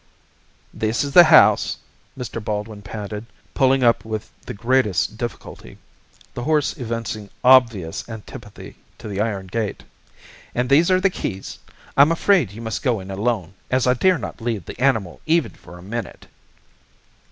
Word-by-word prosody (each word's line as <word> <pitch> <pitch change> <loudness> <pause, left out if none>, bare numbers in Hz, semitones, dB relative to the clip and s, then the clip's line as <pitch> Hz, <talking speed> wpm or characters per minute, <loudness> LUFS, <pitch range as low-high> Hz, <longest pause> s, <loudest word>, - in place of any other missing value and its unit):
"This 110 +4 -1
is 140 - -4
the 175 +3 +9
house," 155 -10 +5 0.4
Mr. 120 -3 -6
Baldwin 105 0 -4
panted, 105 +1 -7 0.3
pulling 135 0 +3
up 115 -4 +3
with 110 -1 -5 0.2
the - - -4
greatest 110 -4 +1
difficulty, 115 - -7 0.6
the 120 - -5
horse 150 +2 +1
evincing 115 -5 -5
obvious 115 -10 +3
antipathy 110 -2 -10 0.2
to - - -9
the 100 -1 -3
iron 105 -3 -2
gate. 105 +2 -4 0.7
"And 125 +2 -1
these 160 +6 +5
are 185 0 +4
the 190 0 +2
keys. 95 - -5 0.4
I'm 145 +3 +6
afraid 165 - +3
you 115 +3 -9
must 110 0 -3
go 125 -6 0
in 95 +1 -8
alone, 100 -3 -2 0.2
as 130 0 +1
I 125 - +4
dare 185 +8 +3
not 120 - -7
leave 110 -6 -3
the - - -9
animal 110 -10 0
even 165 -1 +2
for 90 - -14
a 90 - -13
minute." 115 +4 -6
115 Hz, 155 wpm, -21 LUFS, 105-130 Hz, 0.7 s, the